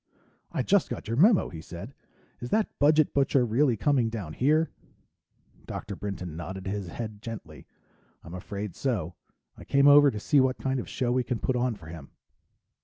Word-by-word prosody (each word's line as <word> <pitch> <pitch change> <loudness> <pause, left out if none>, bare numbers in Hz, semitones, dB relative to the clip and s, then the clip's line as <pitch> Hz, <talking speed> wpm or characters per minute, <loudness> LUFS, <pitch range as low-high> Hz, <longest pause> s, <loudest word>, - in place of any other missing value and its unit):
"I - - -1
just - - +2
got - - -6
your 115 - -1
memo," 195 - +4
he 80 -3 -8
said. 90 +10 -9 0.5
"Is 120 - -6
that 215 - 0
budget 150 +1 +4
butcher 135 -2 +3
really 120 +1 +2
coming 130 -2 +2
down 100 -9 -6
here?" 155 - +2 1.0
Dr. 100 - -6
Brinton 90 -5 -6
nodded 95 +3 -7
his 100 -1 -3
head 110 +2 -7
gently. 105 -11 -9 0.6
"I'm 85 - -10
afraid 100 +1 -6
so. 105 - -2 0.4
I - - -12
came 140 0 +3
over 145 0 +8
to 110 -5 -4
see 145 +7 +3
what 130 0 +2
kind 135 -1 -1
of - - -6
show 120 -2 -1
we 125 0 +1
can 120 0 -2
put 130 - -1
on 125 -1 0
for 80 - -15
him." 80 -4 -10
115 Hz, 180 wpm, -27 LUFS, 95-135 Hz, 1.0 s, over